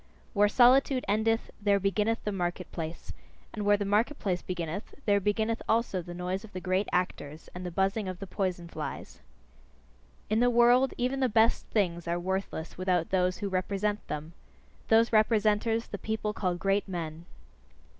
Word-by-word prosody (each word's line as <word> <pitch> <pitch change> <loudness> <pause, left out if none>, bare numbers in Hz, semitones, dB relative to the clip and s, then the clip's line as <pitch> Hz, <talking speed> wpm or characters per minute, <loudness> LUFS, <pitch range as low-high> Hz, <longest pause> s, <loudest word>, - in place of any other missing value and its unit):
Where 205 -1 +4
solitude 255 +3 +4
endeth, 220 +3 +1
there 200 -1 +3
beginneth 210 +4 0
the 210 - -1
market 180 -1 -3
place; 165 0 -6 0.4
and 210 - -4
where 205 0 +4
the 205 - -2
market 215 +8 +1
place 180 -3 -1
beginneth, 175 +2 -5
there 205 -1 +4
beginneth 220 +3 0
also 225 -5 +1
the 175 +1 -9
noise 180 +3 -3
of 220 - -13
the 185 - -4
great 185 +2 0
actors, 160 -4 -2
and 180 - -7
the 180 - -3
buzzing 195 +4 0
of 185 -1 -4
the 195 - -7
poison 180 -3 -3
flies. - - -7 1.1
In 215 +1 +1
the 245 +1 +4
world 245 +2 +4
even 255 +2 -1
the 260 -2 +2
best 225 +1 +3
things 175 -5 -1
are 170 +1 0
worthless 185 -2 -4
without 180 -3 0
those 185 -1 +1
who 205 - -3
represent 200 +2 -1
them: 155 +3 -5 0.5
those 225 +1 +4
representers, 215 +1 +3
the 200 - -4
people 215 -1 -2
call 185 -4 -1
great 195 +3 0
men. 165 -2 -5
200 Hz, 170 wpm, -29 LUFS, 180-220 Hz, 1.1 s, Where